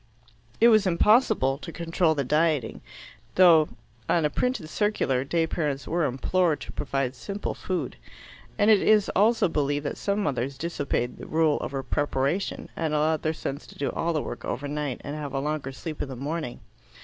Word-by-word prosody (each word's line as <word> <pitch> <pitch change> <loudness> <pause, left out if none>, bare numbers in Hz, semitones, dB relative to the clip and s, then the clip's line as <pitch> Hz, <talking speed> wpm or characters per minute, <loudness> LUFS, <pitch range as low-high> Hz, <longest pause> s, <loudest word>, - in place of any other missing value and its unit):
It 235 - +7
was 215 -3 +5
impossible 185 - +3
to 165 - -8
control 165 -1 +1
the 140 - 0
dieting, 150 -3 +1 0.5
though, 165 -4 +6 0.4
on 165 -3 +3
a 150 - +1
printed 250 -10 -1
circular, 155 -9 0
day 165 +4 +1
parents 145 -5 -2
were 170 0 +1
implored 155 +5 +1
to - - -7
provide 135 -3 -2
simple 200 +10 -5
food. 175 -9 -4 0.6
And 205 +2 +5
it 210 - +5
is 215 -2 +4
also 220 +3 +4
believed 145 -2 -1
that - - -3
some 200 +1 -1
mothers 135 -2 -2
disobeyed 140 -7 -2
the - - -9
rule 155 -2 +2
about 135 -2 -5
preparation, 145 +5 -1
and 155 -2 -1
allowed 155 +1 +1
their 155 - 0
sons 145 -2 -5
to - - -14
do 140 - -1
all 170 - -1
the 155 -3 -1
work - - -7
over 145 - -3
night 145 -3 -3
and 145 - -5
have 145 -2 -5
a - - +1
longer 150 -1 -2
sleep 155 +3 -6
in 140 - -4
the 130 - -6
morning. 145 0 -4
155 Hz, 185 wpm, -26 LUFS, 140-175 Hz, 0.6 s, It